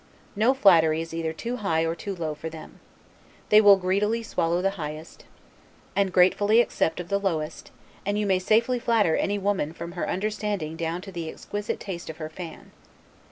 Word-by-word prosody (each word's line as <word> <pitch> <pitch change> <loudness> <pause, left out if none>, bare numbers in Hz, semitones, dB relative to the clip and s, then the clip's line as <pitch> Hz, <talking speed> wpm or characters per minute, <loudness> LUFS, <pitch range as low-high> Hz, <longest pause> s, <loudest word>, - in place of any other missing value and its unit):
No 230 +6 +3
flattery 165 -10 +5
is 165 0 -6
either 165 -1 -2
too 235 +10 -4
high 165 -7 0
or 165 - 0
too 195 +4 -6
low 160 -3 -3
for 150 +2 -6
them. 160 0 -11 0.7
They 210 0 +7
will 200 -2 +8
greedily 205 +5 0
swallow 170 -5 0
the 195 +2 +1
highest, 155 +2 -7 0.7
and 195 -2 +2
gratefully 205 +5 +4
accept 165 -8 +1
of 175 0 -6
the 200 0 +1
lowest; 165 -5 -3 0.3
and 205 +1 -1
you 210 - 0
may 190 -2 +2
safely 230 +6 +2
flatter 225 -8 +2
any 205 +1 0
woman 195 -6 -1
from 170 +1 -7
her 175 - -3
understanding 205 -5 -2
down 165 +1 -3
to 195 - -9
the 170 -3 -5
exquisite 205 +5 -5
taste 175 -4 -6
of 160 - -7
her 155 -2 -6
fan. 165 0 -9
185 Hz, 185 wpm, -25 LUFS, 165-205 Hz, 0.7 s, will